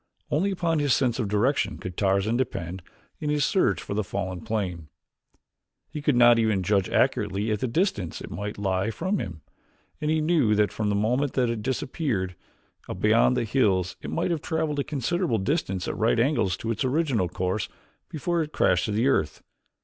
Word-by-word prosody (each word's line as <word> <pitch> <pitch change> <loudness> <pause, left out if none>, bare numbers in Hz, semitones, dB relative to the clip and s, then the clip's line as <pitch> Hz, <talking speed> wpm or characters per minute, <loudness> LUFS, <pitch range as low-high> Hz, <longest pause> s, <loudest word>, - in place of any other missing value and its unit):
Only 175 +7 +2
upon 170 -4 0
his 145 -3 +3
sense 125 -2 0
of 115 - 0
direction 110 +8 +1
could 90 -1 -7
Tarzan 100 +3 +1
depend 95 -8 -3 0.4
in 150 - -2
his 150 -1 +2
search 190 - +1
for - - -5
the 105 +1 0
fallen 95 -1 -4
plane. 95 -8 -3 1.0
He 150 - -5
could 145 -2 +2
not 120 -1 +6
even 110 -4 +1
judge 100 0 +1
accurately 105 +2 +1
as 105 - 0
to 130 - -1
the - - -6
distance 115 - -1
it - - -9
might 105 +2 -5
lie 95 +1 0
from 185 - -1
him, 80 -3 -6 0.6
and 150 - 0
he 160 0 +2
knew 155 -9 +3
that 105 0 +2
from 105 -1 -1
the 100 - +1
moment 125 +7 +1
that 125 -3 +1
it 115 -2 -3
disappeared 120 - -2 0.6
beyond 115 +3 +3
the 125 - +1
hills 95 -7 +1
it - - -6
might 170 +2 -1
have 165 -3 -1
traveled 160 -3 -1
a - - +1
considerable 150 0 -1
distance 95 - -1
at - - -2
right 115 +1 +2
angles 115 - +1
to 115 - -3
its 110 - -1
original 130 - +1
course 90 +3 -2 0.4
before 170 +3 -1
it 155 -1 -4
crashed 90 - +2
to 110 +3 +1
earth. 80 - 0
115 Hz, 190 wpm, -26 LUFS, 100-145 Hz, 1.0 s, not